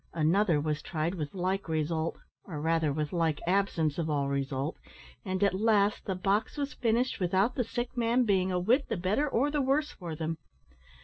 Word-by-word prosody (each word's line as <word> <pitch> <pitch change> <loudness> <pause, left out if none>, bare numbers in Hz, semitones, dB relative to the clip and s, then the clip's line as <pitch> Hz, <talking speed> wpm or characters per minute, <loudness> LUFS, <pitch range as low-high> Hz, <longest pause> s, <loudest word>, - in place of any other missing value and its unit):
Another 170 +1 +3
was 150 0 -1
tried 165 0 -2
with 155 -2 -5
like 185 0 -1
result 160 +1 -1 0.3
or 160 -6 -6
rather 160 -1 +1
with 150 +2 -2
like 165 -3 +1
absence 175 -5 +1
of 160 -1 -1
all 140 -2 0
result, 140 +2 -2 0.4
and 190 -1 -1
at 200 - +3
last 205 0 +2
the 190 - -1
box 200 +8 0
was 285 0 -2
finished 235 +2 0
without 190 +6 +2
the 250 - 0
sick 240 +2 -4
man 240 +1 +2
being 190 -4 +2
a 180 - +1
whit 240 +10 +2
the - - -1
better 205 +12 +1
or 275 +4 +1
the 295 -1 +1
worse 280 +3 +1
for 170 -4 -7
them. 160 +1 -3
185 Hz, 190 wpm, -30 LUFS, 160-225 Hz, 0.4 s, Another